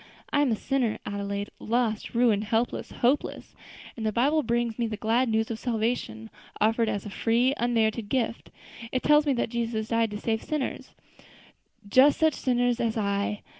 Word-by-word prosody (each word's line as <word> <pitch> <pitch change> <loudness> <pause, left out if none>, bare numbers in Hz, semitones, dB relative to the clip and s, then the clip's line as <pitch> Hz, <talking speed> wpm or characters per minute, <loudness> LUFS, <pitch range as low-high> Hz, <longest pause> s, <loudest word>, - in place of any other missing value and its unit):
I 285 - +4
am 280 -4 +2
a - - +2
sinner, 250 -1 -1
Adelaide, 200 0 -4
lost, 230 -1 -1
ruined, 225 -3 +3
helpless, 225 +3 -1
hopeless, 255 +5 -1 0.4
and 225 - -6
the 215 - +1
Bible 285 +8 +2
brings 235 -2 -1
me 235 - +1
the 215 -1 -4
glad 230 +4 +1
news 220 +1 0
of 220 - -4
salvation 220 - -2 0.3
offered 225 +1 +2
as 200 - -3
a - - -5
free, 240 +5 +2
unmerited 225 -2 0
gift; 235 -3 -2 0.4
it 255 - -1
tells 300 0 +4
me 280 - +3
that 240 - -1
Jesus 230 -2 -2
died 230 -1 +2
to 210 - -5
save 220 0 -1
sinners 300 -4 -4 0.9
just 260 +7 +5
such 315 -1 +4
sinners 245 -1 0
as 230 -2 -1
I. 200 0 -1
230 Hz, 170 wpm, -27 LUFS, 220-245 Hz, 0.9 s, just